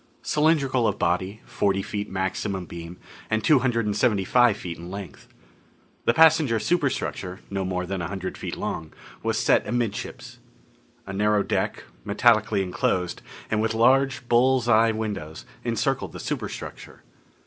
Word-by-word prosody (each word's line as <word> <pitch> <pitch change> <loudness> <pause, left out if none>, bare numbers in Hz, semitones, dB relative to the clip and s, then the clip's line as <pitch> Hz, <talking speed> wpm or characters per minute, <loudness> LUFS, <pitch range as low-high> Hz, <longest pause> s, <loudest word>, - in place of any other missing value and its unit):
Cylindrical 140 -6 +2
of 105 - -1
body, 95 +5 -1
forty 95 -1 0
feet 105 0 -4
maximum 95 0 -2
beam, 85 +1 -9 0.3
and 110 0 0
two 150 -4 +5
hundred 120 -3 0
and 105 -1 -1
seventy 105 -2 +2
five 120 -1 +4
feet 85 -5 -6
in 85 +1 -8
length. 100 0 -8 0.8
The 115 - +4
passenger 155 -7 +5
superstructure 130 - -1
no 95 -1 -1
more 90 -1 -2
than 95 0 -3
a 85 - -2
hundred 95 0 -5
feet - - -5
long 80 -1 -4 0.3
was - - -1
set - - +3
amidships. 115 -2 -3 0.7
A 95 - -6
narrow 105 +1 +2
deck, - - -1 0.2
metallically 110 -1 +3
enclosed, 90 -1 -1 0.3
and 110 -1 +2
with 110 0 0
large 130 +2 +3
bull's 125 +1 +3
eye 115 -1 +5
windows, 105 -8 -4 0.2
encircled - - -1
the - - -7
superstructure. - - -6
105 Hz, 150 wpm, -25 LUFS, 95-120 Hz, 0.8 s, two